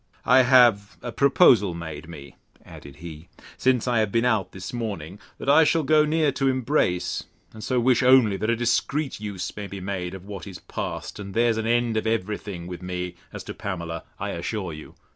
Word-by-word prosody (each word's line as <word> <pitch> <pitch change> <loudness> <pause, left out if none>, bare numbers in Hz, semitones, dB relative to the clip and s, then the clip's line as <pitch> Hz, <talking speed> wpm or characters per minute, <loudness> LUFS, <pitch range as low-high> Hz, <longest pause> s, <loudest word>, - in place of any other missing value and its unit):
I 130 +2 +6
have 120 -5 +4
a 120 - -4
proposal 125 - +4
made 80 -1 -7
me, 70 -4 -11 0.3
added 70 -1 -12
he, 80 0 -10 0.3
since 130 -2 +1
I 120 -2 +2
have 110 -2 0
been 115 +2 +1
out 110 -7 +1
this 95 +3 -8
morning, 100 -6 -5 0.2
that - - -8
I 150 +3 +6
shall 160 +1 +2
go 150 +2 +4
near 155 -1 +2
to 135 - -1
embrace; 130 -8 0 0.3
and 110 -1 -10
so 130 -1 0
wish 120 0 +3
only, 125 -5 +5
that 110 - -2
a 115 - +3
discreet 130 +4 -1
use 100 -4 -5
may 105 -1 -6
be 100 0 -7
made 95 -1 -4
of 95 0 -11
what 100 -3 -8
is 95 -3 -8
past; - - -6
and 100 -1 -8
there's 115 -1 +2
an 110 0 -2
end 120 -1 +1
of 110 - -1
every 105 -2 -1
thing 90 -5 -7
with 90 -1 -7
me, 90 -1 -4 0.2
as - - -8
to - - -7
Pamela, 85 -4 -5 0.2
I'll - - -3
assure 90 0 -4
you. 75 0 -11
105 Hz, 205 wpm, -24 LUFS, 90-125 Hz, 0.3 s, I